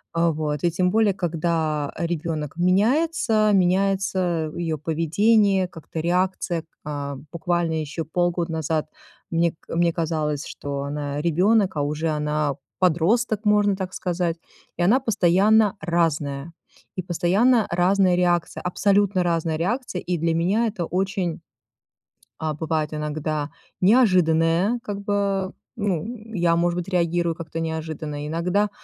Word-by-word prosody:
Э, 170 0 +3
вот, 150 -2 -3
и 170 - +3
тем 180 +1 +1
более 220 -2 +3
когда 160 -4 -1
ребёнок 165 -3 -2
меняется, 220 - +2
меняется 185 -3 +1
её 165 -2 -2
поведение, 190 +6 +2
как-то 165 -2 -7
реакция. 180 -1 0 0.2
А, 145 -2 -4 0.2
буквально 170 0 0
ещё 155 +1 -3
полгода 175 0 -1
назад 160 -1 -1 0.5
мне 170 0 +2
к - - -8
мне 170 0 +3
казалось, 155 -3 -2
что 140 -1 -5
она 145 0 -3
ребёнок, 190 +4 +2
а - - +1
уже 150 +3 -1
она 150 -1 -1 0.2
подросток, 205 +6 +2
можно 205 -1 +3
так 190 -1 -5
сказать, 175 -2 -2 0.4
и 175 - 0
она 225 +9 +4
постоянно 210 -1 +3
разная, 160 -3 -1 0.4
и - - 0
постоянно 195 +7 +2
разная 180 +1 +3
реакция, 175 -1 +1
абсолютно 200 +1 +2
разная 165 -2 0
реакция, 195 +3 -2
и 180 -1 -2
для 165 +1 0
меня 195 +8 +2
это 200 -6 -3
очень, 185 -1 -2 1.0
а, 155 -1 -2
бывает 155 0 -2
иногда 150 0 -3 0.3
неожиданная, 185 -1 +3
как 205 -5 -4
бы, 200 -2 -1 0.3
ну, 195 -7 -1 0.3
я, 170 -3 +2
может 175 +1 +1
быть, 175 - -5
реагирую 170 -2 +1
как-то 165 0 -6
неожиданно, 155 -2 -4
иногда 180 +6 0
175 Hz, 130 wpm, -23 LUFS, 160-195 Hz, 1.0 s, она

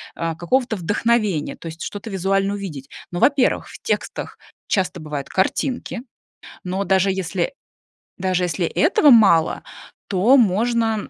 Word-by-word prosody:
а, 165 0 -2
какого-то 240 +8 0
вдохновения, 205 -2 0
то - - -10
есть 165 +1 -7
что-то 205 +2 -6
визуально 195 +1 0
увидеть. 155 -10 -7 0.2
Но, 175 - -3
во-первых, 275 +2 +2
в - - -11
текстах - - -3 0.3
часто 190 -3 0
бывают 150 -3 -6
картинки. 245 +5 -1 0.6
Но 190 +2 -2
даже 190 0 +2
если 190 - -2 0.7
даже 185 -1 0
если 175 +1 -1
этого 310 - +4
мало, 195 -9 +5 0.5
то 205 +8 +4
можно 225 0 +1
195 Hz, 130 wpm, -21 LUFS, 175-230 Hz, 0.7 s, мало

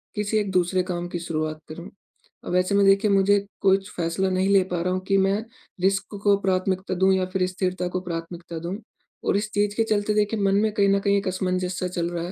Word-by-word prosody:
किसी 210 +1 0
एक 205 -2 -1
दूसरे 185 0 +1
काम 175 -1 -4
की 175 - -4
शुरुआत 155 -2 -3
करूँ। 170 +4 -8 0.6
अब - - -2
ऐसे 180 +2 +2
में 200 0 +4
देखिए 195 +1 +4
मुझे 200 +1 +4 0.2
कुछ 195 0 +2
फ़ैसला 175 +3 -1
नहीं 185 +1 +1
ले 200 -1 +5
पा 175 -1 -1
रहा 180 +1 0
हूँ 185 - 0
कि 195 - +3
मैं 195 +2 +2 0.4
रिस्क 195 +2 0
को 205 -1 +5
प्राथमिकता 185 0 0
दूँ 190 +1 +3
या 190 -1 +1
फ़िर 190 -2 +2
स्थिरता 185 -1 -2
को - - +1
प्राथमिकता 170 -1 -6
दूँ। 175 +4 -4 0.5
और - - +3
इस 210 +1 -3
चीज़ 205 0 +1
के 225 - +2
चलते 210 -1 0
देखिए 210 +1 +1
मन 195 -1 +2
में 215 +2 +2
कहीं 200 -1 +3
न 200 0 +3
कहीं 200 0 +2
एक 195 - -2
असमंजस 185 -1 -1
सा 185 - -1
चल 175 -1 -2
रहा 170 -1 -4
है। - - -6
190 Hz, 235 wpm, -24 LUFS, 180-200 Hz, 0.6 s, ले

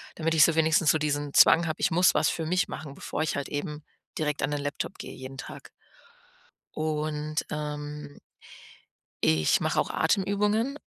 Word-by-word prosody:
Damit 165 0 -1
ich 155 - +7
so 170 - +1
wenigstens 160 -1 +4
so - - +2
diesen 145 -1 -2
Zwang 170 +1 +6
habe: 155 - -4
„Ich - - +2
muss 180 +3 +4
was 150 0 +2
für 165 - -3
mich 180 +3 +1
machen, 150 -3 -7
bevor 150 - -4
ich 155 - -2
halt 140 - -4
eben 150 0 -5 0.3
direkt 150 -3 -1
an 135 - 0
den 145 -1 -2
Laptop 145 0 -4
gehe - - -7
jeden 130 +1 -9
Tag.“ - - -9 1.1
Und, 155 -1 -2
ähm. 150 -1 -6 1.1
ich 80 -1 +3
mache - - +1
auch - - -3
Atemübungen 210 +7 +1
150 Hz, 170 wpm, -27 LUFS, 145-165 Hz, 1.1 s, ich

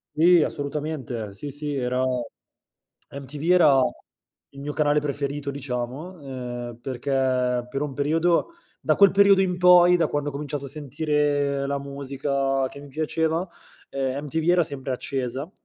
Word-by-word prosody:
Sì, 170 +1 +6
assolutamente 140 -8 -4
sì, 125 +9 -7
sì, 145 +1 -4
era 125 -1 0 1.1
MTV 140 +4 -4
era 155 -7 +6 0.7
il 140 - -12
mio 145 +1 -5
canale 150 0 +2
preferito 145 0 -3
diciamo, 140 +6 -5
ehm, 125 -3 -6
perché 130 -1 0
per 135 - -3
un 145 -2 -3
periodo 165 +5 +1 0.3
da - - +1
quel 200 -1 +7
periodo 200 0 +5
in 180 -2 +1
poi, 180 0 +7
da 170 - +1
quando 145 0 -2
ho - - -4
cominciato 145 0 -5
a - - -6
sentire 145 -1 0
la 140 0 -1
musica 140 -1 -2
che 140 - -12
mi 145 - -11
piaceva, 160 +4 -1 0.4
ehm, 135 +1 -3
MTV 160 +3 0
era 175 0 +4
sempre 140 -3 -4
accesa 130 +3 -3
140 Hz, 145 wpm, -24 LUFS, 135-155 Hz, 1.1 s, quel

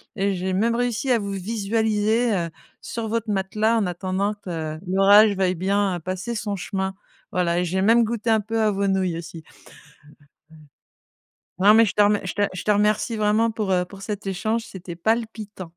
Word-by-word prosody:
et 195 +1 0
j'ai 185 +1 -2
même 230 +5 +1
réussi 245 +1 -1
à 240 - +3
vous 200 -1 -4
visualiser, 220 +3 0
heu, 170 -2 -1 0.3
sur 230 -1 -5
votre 225 0 -2
matelas 210 +3 +1
en 210 - +1
attendant 185 +3 -2
que 160 -5 -5
l'orage 200 +2 +6
veuille 185 -1 +1
bien 190 0 0
passer 185 +7 -4
son 210 -2 -3
chemin. 190 0 -3 0.4
Voilà, 175 -1 +1
et 180 - 0
j'ai 190 +2 -1
même 230 +3 +5
goûté 230 0 -2
un 220 - +4
peu 225 +2 -3
à 215 -1 +3
vos 200 0 -1
nouilles 185 -3 0
aussi. 165 -1 -9 2.1
Non 200 +3 +6
mais 225 +1 +6
je 195 - -2
te 210 - +3
remer 205 0 +3
je 185 - -3
te 205 - 0
je 185 - -6
te 210 - +2
remercie 210 +2 +1
vraiment 215 +2 +2
pour, 210 -3 -2
heu, 180 -1 +2
pour 195 +1 -13
cet 205 -1 -5
échange, 220 +4 -1
c'était 180 -4 -9
palpitant. 215 -1 -3
205 Hz, 185 wpm, -23 LUFS, 185-220 Hz, 2.1 s, l'orage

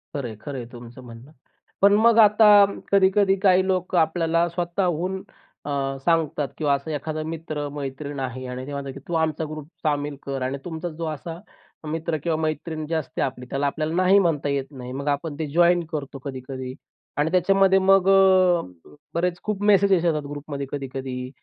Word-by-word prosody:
खरं 135 -4 -3
आहे, 110 - -8
खरं 140 -3 -6
आहे 120 - -5
तुमचं 120 +1 -11
म्हणणं. 120 +4 -12 0.5
पण 200 +1 +6
मग 230 +2 +5
आता 210 0 +6 0.4
कधी-कधी 195 0 +4
काही 190 -1 +4
लोकं 185 -1 0
आपल्याला 165 +1 +1
स्वतःहून 175 +1 -2 0.4
अ, - - -5 0.4
सांगतात 160 -4 +1
किंवा 145 -3 +1
असा 140 +3 -3
एखादा 155 +2 -4
मित्र, 155 -2 -4
मैत्रीण 140 0 -5
आहे 130 0 -4
आणि 125 +1 -6
ते - - -6
म्हणतात, 140 -1 -5
की 140 - -9
तू 175 - -5
आमचा 160 0 -1
ग्रुप 155 -1 -7 0.2
सामील 145 -2 -1
कर. 135 -1 -4
आणि 130 +2 -2
तुमचा 165 0 -4
जो 165 +1 -6
असा 165 +2 -6 0.5
मित्र 160 0 -2
किंवा 165 -2 0
मैत्रीण 155 0 -3
जी 165 - -4
असते 155 -4 -3
आपली, 125 -1 -3
त्याला 140 +1 0
आपल्याला 155 +2 -2
नाही 185 +2 +5
म्हणता 160 -6 0
येत 140 -1 -1
नाही. 125 -2 -8
मग 140 +2 -5
आपण 145 +1 -7
ते 155 - -2
जॉइन 175 0 +4
करतो 140 -2 -5
कधी-कधी. 130 -1 -6 0.4
आणि 150 +3 +1
त्याच्यामध्ये 190 +1 +4
मग 195 0 +4
अ, 185 -2 +5 0.5
बरेच 175 +1 -1
खूप 210 -2 -3
मेसेज 200 0 +4
येतात, 155 -3 +1
ग्रुपमध्ये 145 -1 -6
कधी-कधी 130 -2 -5
155 Hz, 175 wpm, -24 LUFS, 140-180 Hz, 0.5 s, पण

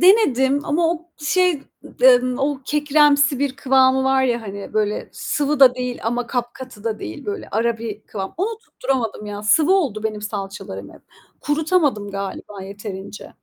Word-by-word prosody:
denedim 285 - +4
ama 325 +2 +1
o 340 +1 -12
şey, 335 0 +1 0.4
eee, 250 -1 +7 0.2
o 275 0 -1
kekremsi 295 -1 +3
bir 275 -1 -1
kıvamı 265 0 +3
var 265 0 +3
ya 240 -3 0
hani 200 -1 -7
böyle 210 -1 0
sıvı 295 -1 -1
da 255 -2 +8
değil 250 -1 -4
ama 240 +1 -1
kapkatı 245 -2 -5
da 220 -2 -2
değil 105 +1 -7
böyle 205 - -4
ara 225 +1 0
bir 220 -2 -6
kıvam. 195 -2 -6
Onu 435 +5 -2
tutturamadım 255 - -3
ya. 205 0 -6
Sıvı 300 - +4
oldu 265 - 0
benim 215 -1 -2
salçalarım 205 -1 -6
hep. - - -17 0.4
Kurutamadım 295 - +1
galiba 200 0 -6
yeterince. 200 0 -8
255 Hz, 155 wpm, -21 LUFS, 210-290 Hz, 0.4 s, da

